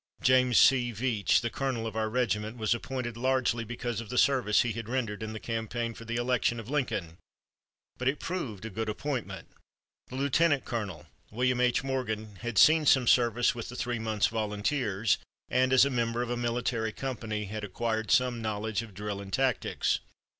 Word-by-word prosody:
James 125 -2 +4
C. 125 -3 +5
Veatch, 110 -2 +1
the 120 0 -2
colonel 130 -4 -2
of 110 -1 -5
our 110 -1 0
regiment, 110 -2 -1
was 110 0 +1
appointed 120 -1 -4
largely 125 -1 +1
because 120 0 -4
of 110 - -10
the 125 - -3
service 125 -6 +4
he 120 - -1
had 115 0 -6
rendered 115 -5 -2
in 110 0 -4
the 110 - -6
campaign 115 +1 -3
for 115 - -11
the 115 +1 -3
election 120 -1 +1
of 115 +3 -8
Lincoln, 95 - -2 0.8
but 125 - -1
it 135 +3 +1
proved 125 - -4
a 110 - -5
good 110 +2 -3
appointment. 130 +2 -4 0.6
The 130 - -9
lieutenant 140 +1 +2
colonel, 100 -10 -4 0.2
William 125 +2 +1
H. 125 +1 +2
Morgan, 110 -6 -3
had 120 +1 -5
seen 155 -1 +6
some 130 -2 +5
service 120 0 +3
with 115 -1 -6
the 125 - -8
three 120 -1 -2
months' 110 -2 +1
volunteers 105 0 0 0.3
and 130 +1 +2
as 130 +1 +7
a 140 - -1
member 120 -1 0
of 120 - -4
a - - 0
military 120 -1 -1
company 110 -3 -4
had 105 +2 -6
acquired 110 +2 -2
some 125 -4 +2
knowledge 110 0 -2
of 110 -4 -11
drill 100 0 -4
and 100 -1 -9
tactics. 130 +1 +1
115 Hz, 185 wpm, -29 LUFS, 110-125 Hz, 0.8 s, as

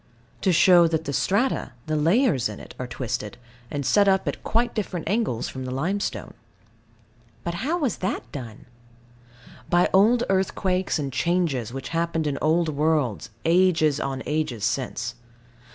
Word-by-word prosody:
To 190 - +3
show 175 +1 +6
that 160 -1 -1
the 140 - -3
strata, 205 - 0
the 155 - -1
layers 160 - +2
in - - -8
it, - - -11
are 125 - -4
twisted, 120 -3 -4 0.3
and 140 -1 -3
set 205 +6 +4
up 190 -1 +2
at - - -3
quite 235 +1 +1
different 185 -7 -3
angles 200 - 0
from 130 - -6
the 130 - -5
limestone. 170 +11 -2 1.1
But 170 - -3
how 320 +6 0
was 280 - -1
that 185 - -2
done? 120 -6 -8 1.0
By 175 0 +3
old 225 +5 +5
earthquakes 190 -1 0
and 140 -3 -3
changes 145 -6 0
which 135 +1 -6
happened 165 -1 -1
in 140 -2 -1
old 160 +1 +2
worlds, 145 - 0 0.2
ages 165 -4 +3
on 135 -2 -3
ages 150 -8 -2
since. 120 0 -2
160 Hz, 150 wpm, -24 LUFS, 135-190 Hz, 1.1 s, show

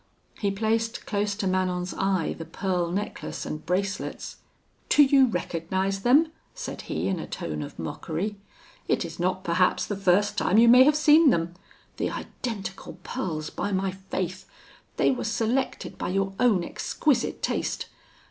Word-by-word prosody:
He 200 - +1
placed 225 +3 -1
close 205 -1 -1
to 200 - -3
Manon's 185 -1 0
eye 190 -4 0
the 165 - -7
pearl 180 0 -1
necklace 200 +4 -4
and 155 0 -5
bracelets. 195 +2 -3 0.5
'Do 295 - +7
you 270 -1 +5
recognise 190 0 -2
them?' 285 +10 +4 0.2
said - - -6
he, - - -1
in 190 -3 -1
a - - -6
tone 75 -2 -4
of 75 - -8
mockery; 190 +7 -3 0.5
'it - - +1
is 165 0 -8
not, 185 +1 0
perhaps, 180 +1 +2
the 205 - -3
first 195 +2 +2
time 195 - +2
you 235 +1 +7
may 250 +2 +8
have 300 +1 +5
seen 305 0 +6
them. 170 -6 +1 0.4
The - - 0
identical 195 -5 -6
pearls, 155 -4 -4
by 205 - -3
my 190 0 0
faith! 190 -1 -5 0.5
They - - +4
were 255 - -2
selected 230 +4 -1
by - - -2
your 195 +1 0
own 215 -8 +4
exquisite 265 - -1
taste! - - -1
195 Hz, 155 wpm, -26 LUFS, 180-225 Hz, 0.5 s, may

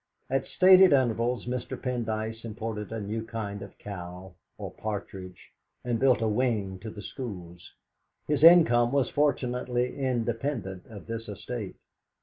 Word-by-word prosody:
At 135 0 0
stated 185 -2 +7
intervals 120 -2 +1
Mr. 125 0 -4
Pendyce 115 -3 -3
imported 110 -1 -5
a 115 - -3
new 110 +2 -3
kind 105 -3 -5
of 100 - -10
cow, 90 -2 -8 0.2
or - - -6
partridge, 95 -4 -7 0.3
and 120 -2 0
built 130 -3 +3
a - - +2
wing 105 -5 0
to 110 - -7
the 105 -1 -9
schools. 90 -9 -8 0.5
His 150 0 0
income 125 -9 +7
was 140 -3 +1
fortunately 125 -3 0
independent 120 -6 -2
of 105 -3 -11
this 115 -1 -6
estate. 105 0 -6
115 Hz, 135 wpm, -28 LUFS, 105-125 Hz, 0.5 s, stated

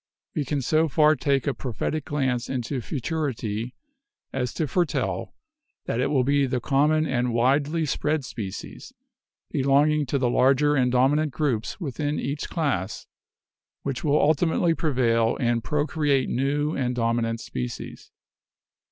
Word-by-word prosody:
We 150 - -1
can 140 0 -1
so 155 +5 +2
far 155 +1 +4
take 140 -1 0
a 140 - +1
prophetic 135 +5 -3
glance 130 -4 -1
into 130 0 -2
futurity 125 -5 -3 0.6
as 125 -3 -1
to 155 - -1
foretell 175 +3 -1 0.5
that 115 - -2
it 125 - +2
will 140 -3 +2
be 140 +1 +2
the 125 -1 -1
common 150 +4 +2
and 125 -4 0
widely 140 +6 +2
spread 150 0 -1
species, 100 -7 -7 0.6
belonging 145 +2 +3
to 140 - 0
the 130 -2 +1
larger 135 +4 +3
and 125 -3 +2
dominant 140 +4 +3
groups 125 - -1
within 145 -2 -2
each 145 +2 -3
class, 110 - -2 0.8
which 135 -2 -3
will 150 -1 +3
ultimately 165 +2 +2
prevail 120 -7 +1
and 120 -2 +1
procreate 145 +1 +1
new 145 +4 0
and 125 -2 -1
dominant 115 -1 0
species. 60 - -6
135 Hz, 135 wpm, -25 LUFS, 125-150 Hz, 0.8 s, far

